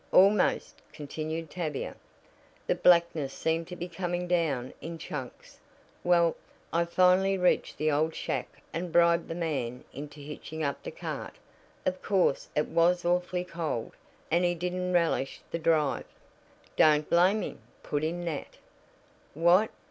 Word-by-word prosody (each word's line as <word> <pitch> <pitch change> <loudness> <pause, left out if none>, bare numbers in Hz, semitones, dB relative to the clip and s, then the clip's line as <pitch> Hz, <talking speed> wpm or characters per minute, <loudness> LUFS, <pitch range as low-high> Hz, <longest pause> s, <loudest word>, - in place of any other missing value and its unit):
"Almost," 195 +1 +4
continued 155 +1 -5
Tavia. 155 -6 -3 0.7
"The - - +2
blackness 170 -5 +3
seemed 165 0 -1
to 180 - -7
be 175 0 -5
coming 175 0 -3
down 155 -8 0
in 165 +1 -6
chunks. 150 -5 -8 0.4
Well, 170 -2 +4 0.4
I 170 +1 +2
finally 185 +3 +4
reached 180 -1 +1
the 155 0 +1
old 155 +2 +1
shack - - -4
and 170 +1 -3
bribed 170 0 +4
the 165 - -4
man 135 -8 -2
into 145 +2 -8
hitching 150 +2 -6
up 140 -1 -2
the - - -6
cart. - - -6 0.5
Of 185 0 -1
course, 190 -8 +1
it 150 - +1
was 175 +2 +2
awfully 180 +1 +1
cold, 165 -10 -3 0.4
and 170 +2 +3
he 175 0 +2
didn't 180 +1 -2
relish 165 -6 +1
the 165 - -2
drive." 155 -3 +1 0.7
"Don't 150 -1 +5
blame 185 +5 +4
him," - - -6 0.2
put 145 0 -2
in 175 +2 -2
Nat. 160 -4 -5 0.8
"What?" 175 +7 +5
170 Hz, 140 wpm, -29 LUFS, 155-180 Hz, 0.8 s, Don't